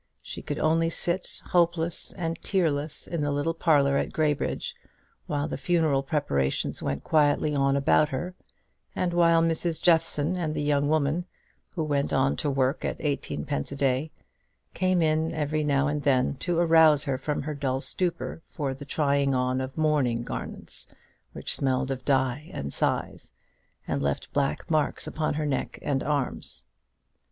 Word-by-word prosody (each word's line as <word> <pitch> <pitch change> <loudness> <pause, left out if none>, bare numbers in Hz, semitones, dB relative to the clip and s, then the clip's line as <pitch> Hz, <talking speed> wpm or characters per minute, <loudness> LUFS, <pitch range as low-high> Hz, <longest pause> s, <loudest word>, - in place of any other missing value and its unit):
She - - -7
could 145 - -4
only 165 +1 +2
sit 175 +2 0
hopeless 170 -1 +1
and 165 -3 -4
tearless 155 -6 0
in 170 -3 -3
the 145 - 0
little 145 +3 0
parlour 140 -4 +3
at - - -1
Graybridge 150 -2 -1 0.5
while 145 0 -1
the 150 - -5
funeral 155 -2 +2
preparations 135 - -1
went 70 -1 -3
quietly 150 -1 +2
on 135 -1 +2
about 150 +2 +3
her, 165 +7 -4 0.6
and 175 -1 -1
while 170 -1 +4
Mrs. 165 0 0
Jeffson 165 -1 +3
and 160 -4 -2
the - - -1
young 145 -1 +1
woman, 155 +3 +1 0.5
who 165 - -1
went 145 -2 0
on 135 +1 +2
to 150 - 0
work 135 +1 0
at - - -2
eighteenpence 130 - -2
a - - -4
day, 135 +2 0 0.6
came 185 -2 +2
in 160 +1 +1
every 155 0 -1
now 140 -1 +2
and 145 0 -1
then 130 -3 +2
to 175 +4 -1
arouse 160 -3 +5
her 135 -3 -2
from 145 +2 -2
her 150 +1 -3
dull 135 -2 -1
stupor 175 +2 -2
for 140 -3 -3
the 140 +2 -10
trying 140 -1 +1
on 130 +1 0
of 130 +2 -6
mourning 145 -7 +1
garments - - -4 0.5
which - - -2
smelt 130 -1 0
of 130 -1 -4
dye 135 +2 0
and 70 0 -4
size, - - -2 0.6
and 70 - -1
left 70 -1 -2
black 140 +4 -1
marks 155 -1 0
upon 155 -2 -2
her 155 0 -1
neck 140 -3 -2
and 135 -2 0
arms. 135 - 0
145 Hz, 165 wpm, -27 LUFS, 135-160 Hz, 0.6 s, arouse